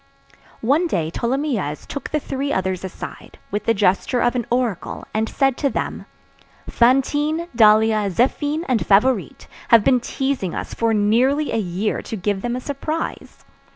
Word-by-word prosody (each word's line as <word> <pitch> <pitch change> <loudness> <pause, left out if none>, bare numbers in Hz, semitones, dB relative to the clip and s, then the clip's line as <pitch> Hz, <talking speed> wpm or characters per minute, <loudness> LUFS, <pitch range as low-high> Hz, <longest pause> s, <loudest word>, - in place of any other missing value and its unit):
One 300 +8 +3
day 165 - -1
Tholomyès 235 - -2
took 280 - -6
the 305 - 0
three 280 0 -3
others 190 -3 -1
aside, 190 - -8
with 205 +1 -2
the 230 - +3
gesture 195 +5 +1
of 240 - +2
an 240 -3 -2
oracle, 240 -6 -2
and 220 +1 0
said 270 -2 +1
to 280 - +1
them:— - - -4 0.6
"Fantine, 290 +7 +2
Dahlia, 215 -1 +4
Zéphine, 290 - 0
and 250 -5 +1
Favourite 210 +1 +2 0.2
have 230 -3 +6
been 255 +1 +4
teasing 260 -6 -2
us - - -5
for 230 -1 0
nearly 250 +8 +2
a - - +1
year 195 +2 -2
to - - -6
give 195 +1 -1
them 240 +2 -2
a - - -3
surprise. 295 +4 -5
240 Hz, 155 wpm, -21 LUFS, 205-275 Hz, 0.6 s, have